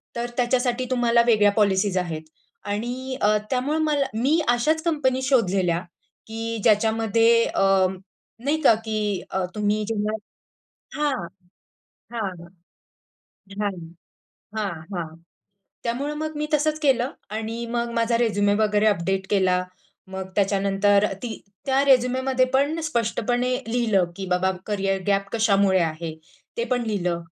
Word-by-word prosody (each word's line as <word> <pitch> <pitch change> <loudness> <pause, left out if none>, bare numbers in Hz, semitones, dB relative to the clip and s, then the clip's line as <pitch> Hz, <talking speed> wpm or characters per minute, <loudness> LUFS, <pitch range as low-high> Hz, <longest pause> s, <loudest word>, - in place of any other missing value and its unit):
तर 240 0 -3
त्याच्यासाठी 245 0 +1
तुम्हाला 235 -2 +3
वेगळ्या 210 -3 +5
पॉलिसीज 200 -2 +2
आहेत 165 -3 -2 0.5
आणि 250 +5 -3
अ, 210 +1 +4
त्यामुळे 265 +4 0
मला 300 -3 +1
मी 270 +9 +2
अशाच 305 +7 +2
कंपनी 280 -6 +1
शोधलेल्या, 195 -10 +2 0.5
की 225 +1 -4
ज्याच्यामध्ये 225 +1 +3
अ, 195 -1 +3 0.6
नाही 310 +2 +1
का, 275 - +6
की 210 -3 -1
अ, 190 -1 0
तुम्ही 210 0 0
जेव्हा 215 -1 -1 0.9
हां, 295 -1 +2 1.0
हां, 215 -5 -2 1.3
हां, 205 -1 0 0.8
हां, 210 -2 -1 0.2
हां, 165 -3 -4 0.7
त्यामुळं 265 +5 -2
मग 310 0 -4
मी 300 0 -1
तसंच 305 +1 +1
केलं 265 -3 +2 0.3
आणि 225 +2 -4
मग 235 0 -1
माझा 230 0 +2
रेझ्युमे 205 -3 +2
वगैरे 210 0 +2
अपडेट 195 -1 +1
केला. 185 -2 +2 0.5
मग 190 0 -5
त्याच्यानंतर 200 0 +2 0.2
ती 240 -2 -3 0.3
त्या 270 +1 +3
रेझ्युमेमध्ये 260 0 +3
पण 285 +4 +2
स्पष्टपणे 245 -1 0
लिहिलं, 225 -5 +2
की 195 - -5
बाबा 180 +1 +1 0.2
कॅरियर 195 -2 -1
गॅप 200 0 +1
कशामुळे 200 -4 +3
आहे? 160 -1 -2 0.4
ते 470 - 0
पण 245 -1 +1
लिहिलं 180 -5 -1
225 Hz, 125 wpm, -24 LUFS, 200-255 Hz, 1.3 s, का